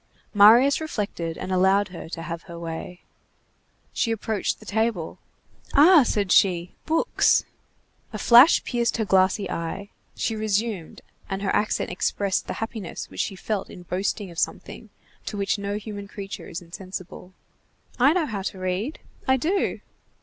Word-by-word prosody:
Marius 235 +8 +6
reflected, 200 - -4
and 185 - -5
allowed 190 +2 +3
her 175 -2 -9
to 165 -1 -6
have 170 0 -5
her 170 - -8
way. 170 +1 -7 0.9
She 230 - 0
approached 220 -1 -2
the 215 - -15
table. 220 -5 -1 0.6
"Ah!" 315 +3 +8
said 205 -6 0
she, 180 -2 +3
"books!" 325 +9 +3 0.7
A - - -5
flash 245 +7 +7
pierced 240 -1 0
her 220 - 0
glassy 190 +1 +2
eye. 180 +5 -5 0.2
She 225 - -1
resumed, 215 -4 -2 0.3
and 195 0 -3
her 195 - 0
accent 210 - 0
expressed 190 +2 -1
the - - -3
happiness 225 -5 -6
which - - -9
she 195 - -3
felt 200 +1 -3
in 180 - -11
boasting 190 +2 -2
of 170 - -6
something, - - -3 0.4
to 210 - -4
which 200 +1 0
no 200 0 -3
human 205 -1 -7
creature 195 0 -8
is 170 - -7
insensible:— 185 +1 -9 0.7
"I 265 +4 +6
know 350 -3 +1
how 210 -7 -4
to 190 - -4
read, 185 - -3 0.3
I 265 0 +4
do!" 370 +9 -1
200 Hz, 155 wpm, -24 LUFS, 185-225 Hz, 0.9 s, Ah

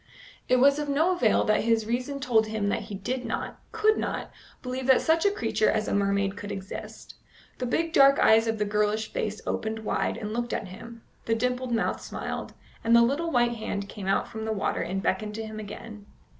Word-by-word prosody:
It 255 - +5
was 280 +3 +5
of 295 -1 -3
no 310 +6 +3
avail 240 -10 +3
that 215 - +2
his 225 -1 +2
reason 250 +5 -2
told 225 -5 +2
him 215 -2 -1
that 225 - 0
he 210 -1 -6
did 245 +7 -3
not, 230 - -4
could 435 -1 +3
not, - - -3 0.3
believe 255 0 -4
that 265 -1 +6
such 325 +4 +3
a - - +5
creature 225 - +1
as 215 -1 0
a - - -1
mermaid 200 -1 +1
could 205 0 -7
exist. 190 -1 -8 0.5
The 250 - -2
big 330 +6 0
dark 275 -2 +7
eyes 225 +1 +5
of 225 0 0
the 210 - 0
girlish 210 +1 0
face 215 0 -2
opened 220 0 -3
wide - - 0
and 215 -1 -5
looked 240 +1 -2
at 195 - -3
him, 230 +5 -11 0.2
the 225 - +1
dimpled 250 +2 -1
mouth 230 -1 0
smiled, - - -5 0.3
and 230 +1 +4
the 235 - +7
little 285 +8 0
white 240 -4 +2
hand 200 -2 -4
came 200 -2 -7
out 195 - +1
from 220 0 -6
the 220 - -1
water 205 - -1
and 190 +2 -3
beckoned 210 +3 -1
to 225 0 -4
him 215 0 -7
again. 210 0 -9
225 Hz, 215 wpm, -27 LUFS, 210-250 Hz, 0.5 s, dark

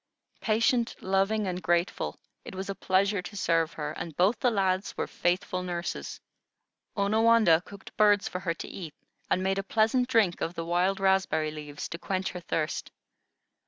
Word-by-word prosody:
Patient, 230 +2 +1
loving, 195 +3 +1
and 180 -1 -3
grateful, 175 +1 0 0.3
it - - -9
was 195 +1 -4
a - - -3
pleasure 195 +1 +1
to 205 +3 -9
serve 165 -2 +1
her, 150 -1 -4
and 160 -1 -7
both 190 +6 +3
the 250 - +3
lads 195 -3 0
were - - 0
faithful 180 +1 -1
nurses. 175 -1 -4 0.8
Onawandah 215 -4 +4
cooked 200 -1 -12
birds 205 -1 +4
for 185 - -4
her 175 -3 -2
to - - -7
eat, 165 -6 -8 0.3
and 185 - +1
made 195 +1 +1
a - - -2
pleasant 225 +5 +2
drink 225 -9 +2
of 165 - -2
the 165 - -4
wild 180 +3 +1
raspberry 190 -5 +2
leaves 150 -1 -7
to 170 - -6
quench 190 0 -2
her 180 - -6
thirst. 160 -2 -2
190 Hz, 170 wpm, -28 LUFS, 175-205 Hz, 0.8 s, Onawandah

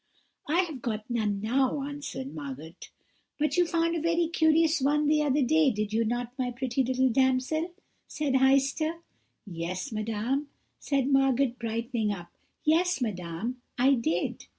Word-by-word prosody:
"'I 340 +4 +4
have 315 -8 -5
got 220 -3 -3
none 210 -4 0
now,' 265 +5 +1
answered 285 -2 -6
Margot. 145 +2 -7 0.6
"'But 305 +1 0
you 355 -1 +3
found 335 0 +1
a 330 - -1
very 335 +1 +2
curious 320 -1 +3
one 295 +2 +2
the 300 +1 +3
other 290 -1 +2
day, 310 +3 +4
did 215 -2 -2
you 225 +1 +2
not, 240 +2 -2
my 250 -1 0
pretty 255 +1 -1
little 260 +1 +2
damsel?' 260 +7 +1 0.4
said 295 -3 -2
Heister. 275 +5 +2 0.4
"'Yes, 185 +6 -4
madame,' 225 +6 -2 0.3
said 275 -1 0
Margot, 270 -1 +3
brightening 230 -1 -1
up; 175 -3 -7 0.3
'yes, 345 +3 +2
madame, 210 +2 -4 0.2
I 260 +3 +5
did.' 175 -9 -1
260 Hz, 150 wpm, -28 LUFS, 225-300 Hz, 0.6 s, I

